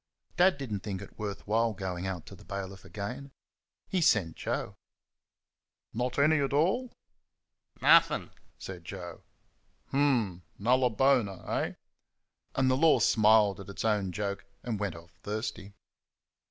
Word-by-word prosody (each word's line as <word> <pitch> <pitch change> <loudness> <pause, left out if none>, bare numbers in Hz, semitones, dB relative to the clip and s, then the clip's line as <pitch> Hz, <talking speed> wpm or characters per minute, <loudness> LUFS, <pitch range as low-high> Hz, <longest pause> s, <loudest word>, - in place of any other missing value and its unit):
Dad 185 +1 +4
did 130 -6 -5
n't 100 - -2
think 95 -2 -4
it - - -15
worth 100 -2 -5
while 115 +2 +2
going 95 -2 -4
out 90 -4 -4
to - - -11
the - - -16
bailiff 95 -1 -6
again. 125 +7 -6 0.6
He 185 - 0
sent 95 - +3
Joe. - - -3 1.2
"Not 125 +2 -2
any 155 +2 +4
at 140 0 -1
all?" 195 - +2 0.9
"Nothink," - - +5 0.3
said 90 -3 -8
Joe. 90 -1 -8 0.7
"H'm! 120 -11 +1 0.2
Nulla 125 +4 +3
bona, 110 -6 +1
eh?" - - -1 0.8
And 130 -1 +3
the 130 - +2
Law 160 +2 +5
smiled 105 -2 +4
at 100 - -9
its 100 - -5
own 105 -4 +1
joke 100 0 -3 0.2
and 115 -4 -3
went 100 -5 -2
off 85 0 -13
thirsty. 105 -1 -5
105 Hz, 140 wpm, -30 LUFS, 95-130 Hz, 1.2 s, Nothink